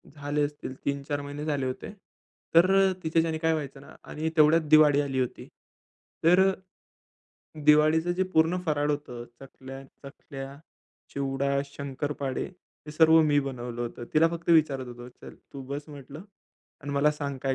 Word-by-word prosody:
झाले 145 0 -2
असतील 145 -2 -7
3-4 140 +1 -2
महिने 145 +1 -7
झाले 145 -4 -1
होते. 130 +8 -5 0.6
तर 175 +3 +6
अ, 195 -1 +4
तिच्याच्याने 160 0 +1
काय 160 0 +1
व्हायचं 140 -3 -5
ना - - -15
आणि 155 +1 -3
तेवढ्यात 155 +2 +5
दिवाळी 150 -2 +6
आली 135 -2 -2
होती. 125 -2 -3 0.8
तर 175 +3 +5
अ, 190 - 0 1.1
दिवाळीचं 155 +3 +4
जे 190 - +2
पूर्ण 160 +3 +3
फराळ 150 -1 0
होतं 135 -5 -5 0.2
चकल्या, 135 0 -11 0.2
चखल्या, 140 0 -9 0.6
चिवडा, 140 0 -1
शंकरपाळे 140 -1 -4 0.4
हे 150 - -8
सर्व 160 +1 +6
मी 150 -2 +3
बनवलं 120 -3 -6
होतं. 120 0 -6
तिला 160 +2 +5
फक्त 170 0 -4
विचारत 145 -5 +3
होतो 120 0 -10
"चल, 125 - -14 0.2
तू 140 - -8
बस 145 +2 -6
म्हटलं 145 +2 -10 0.6
आणि 145 0 -5
मला 140 +1 +3
सांग, 140 -2 -5
काय 135 -1 0
145 Hz, 155 wpm, -27 LUFS, 135-155 Hz, 1.1 s, तर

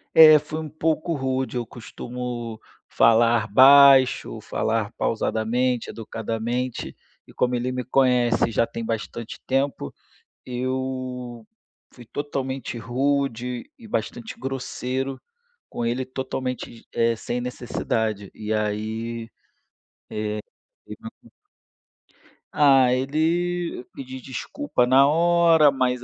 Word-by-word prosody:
É, 155 -1 +10
fui 155 +2 -5
um 155 -1 -6
pouco 160 +2 -1
rude, 130 -1 -2
eu 120 - -2
costumo 120 0 -7 0.3
falar 115 0 +4
baixo, 135 +1 +6
falar 110 -1 -1
pausadamente, 115 +2 0
educadamente, 115 +2 -4 0.3
e - - -16
como 125 0 0
ele 125 +1 -1
me 125 0 -3
conhece 125 -3 +2
já 115 - +1
tem 115 - -6
bastante 115 +1 -5
tempo, 135 - -1 0.5
eu 130 -1 -4 0.5
fui 120 -2 -13
totalmente 135 -1 -4
rude 125 - -1
e 230 -3 -13
bastante 230 +1 -4
grosseiro 130 0 -4 0.5
com 120 - -4
ele 120 +3 -1
totalmente, 130 -2 -5
eh, 115 0 +1
sem 120 +2 -4
necessidade. 110 -4 -3
E 105 0 -6
aí, 110 +2 -2 0.8
eh, 105 0 -3 0.5
teve - - -9 0.3
um - - -18 1.3
Ah, 135 -4 +5
ele 165 +4 -1
pedi 130 -1 -8
desculpa 130 - -2
na 135 +2 +6
hora, 165 -1 +5
mas, 125 -2 0
125 Hz, 105 wpm, -24 LUFS, 115-135 Hz, 1.3 s, É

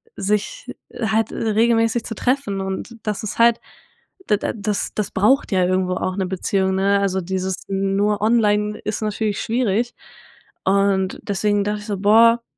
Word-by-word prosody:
sich 210 - -2 0.3
halt 220 -1 0
regelmäßig 225 +1 +1
zu 225 - -5
treffen 230 -5 -1
und 190 +4 -5
das 210 0 -3
ist 210 - -5
halt 235 0 +5 0.7
d 210 - +4
da - - -3
das 210 -1 -3
das 210 -2 -1
braucht 240 +9 +2
ja 185 -2 +3
irgendwo 185 0 0
auch 185 0 -2
'ne 190 - -1
Beziehung, 190 +1 0
ne? 200 +1 +2
Also 190 -1 0
dieses 190 +1 -2
nur 195 +1 0
online 210 -2 +2
ist 215 - -4
natürlich 215 -1 -2
schwierig 235 0 0 0.7
und 195 -1 +1
deswegen 205 +1 0
dacht 210 +1 -2
ich 210 - -10
so: 200 -2 -2
„Boah, 230 +4 +5
205 Hz, 155 wpm, -21 LUFS, 195-225 Hz, 0.7 s, halt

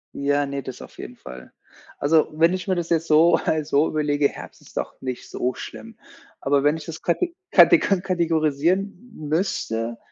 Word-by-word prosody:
Ja, 145 +1 +1
ne, 140 0 -5
das 130 - -8
auf - - -13
jeden - - -8
Fall. 65 0 -11 0.5
Also, 155 +2 +3
wenn 165 +3 +3
ich 185 +1 -4
mir 190 - +1
das 175 -1 -3
jetzt 165 -1 +1
so 160 +3 +5
halt 155 -2 0
so 150 +1 +3
überlege, 145 -1 +1
Herbst - - -11
ist - - -15
doch - - -3
nicht 130 -2 -6
so 125 +1 -2
schlimm, - - -10 0.4
aber 140 0 +1
wenn 150 +2 +3
ich 155 - -10
das 165 -1 -8
kate 335 - -1 0.2
katego 310 - +6
kategorisieren 165 -2 +1 0.4
m 155 - -6
müsste, 115 - -1
155 Hz, 185 wpm, -23 LUFS, 140-170 Hz, 0.5 s, katego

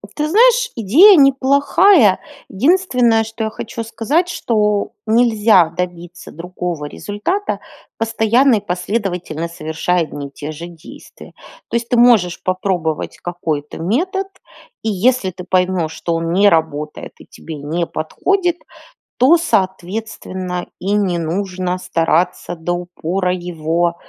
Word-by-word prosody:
Ты 300 0 -1
знаешь, - - +4
идея 285 - +6
неплохая. 275 - +4 0.3
Единственное, 250 - +2
что 225 +1 -6
я - - -2
хочу 230 +1 -6
сказать, 230 +10 0
что 210 -9 0
нельзя 220 -6 +4
добиться 175 0 -6
другого 175 -2 -5
результата, 210 - -3 0.4
постоянно 225 +3 +2
и 205 -1 -3
последовательно 180 -3 -3
совершая 170 +2 -2
одни 145 -2 -7
и - - -17
те 145 +2 -7
же 155 +2 -8
действия. 170 -2 -14 0.4
То - - -3
есть, 235 0 -1
ты 245 - +2
можешь 230 -8 +4
попробовать 185 -4 -2
какой-то 160 -4 -4
метод, 355 - -1 0.5
и 225 - -2
если 215 +1 +1
ты 180 +1 -9
поймешь, 180 -3 +1
что 170 - -3
он 165 0 -2
не 200 +3 +5
работает, 150 -3 -2
и - - -14
тебе 160 - -9
не 155 +4 -2
подходит, 350 - -1 0.6
то, 270 +8 +5
соответственно, 185 - -3
и 195 +2 -3
не 195 -4 +1
нужно 180 +2 -2
стараться 175 0 0
до 170 +1 -3
упора 180 +1 -2
его, 170 -1 -1
185 Hz, 125 wpm, -17 LUFS, 170-235 Hz, 0.6 s, идея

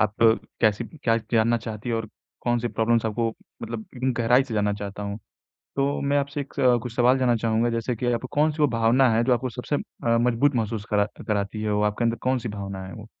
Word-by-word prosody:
आप 105 0 +1 0.5
कैसी 110 +1 +2
क्या 115 -5 -1 0.2
जानना 115 +1 +3
चाहती 110 +1 -6
है 115 - 0
और 115 -1 -3 0.3
कौन 120 0 +1
से 120 +1 -2
प्रॉब्लेम्स 115 0 +1
आपको 115 +1 0 0.3
मतलब 115 -1 -5
एकदम 130 0 0
गहराई 120 +3 +3
से 125 -5 -6
जानना 105 -1 +1
चाहता 100 0 -6
हूँ। 100 +1 -4 0.6
तो 140 +1 +1
मैं 140 +1 +1
आपसे 140 +1 -2
एक 140 - -8
स 125 -2 +4
कुछ 120 -1 -6
सवाल 125 +2 +4
जानना 120 -2 +3
चाहूँगा 115 +1 +1
जैसे 115 +1 -1
कि 125 - -3
आपको 120 +2 -2
कौन 150 +2 +3
सी 150 0 -2
वो - - +7
भावना 120 +3 +3
है 115 - +3
जो 130 - +3
आपको 130 +2 -2
सबसे 125 +5 -2
अ, - - -2 0.4
मजबूत 125 +4 +2
महसूस 110 -2 -2
करा 105 -1 +3 0.2
कराती 105 +1 -1
है, 105 - -1
वो 105 0 +1
आपके 105 +3 0
अंदर 115 0 +1
कौन 130 0 +1
सी 120 -1 -5
भावना 100 -2 -5
है - - -9
वो? 110 -2 -10
115 Hz, 235 wpm, -25 LUFS, 110-125 Hz, 0.6 s, वो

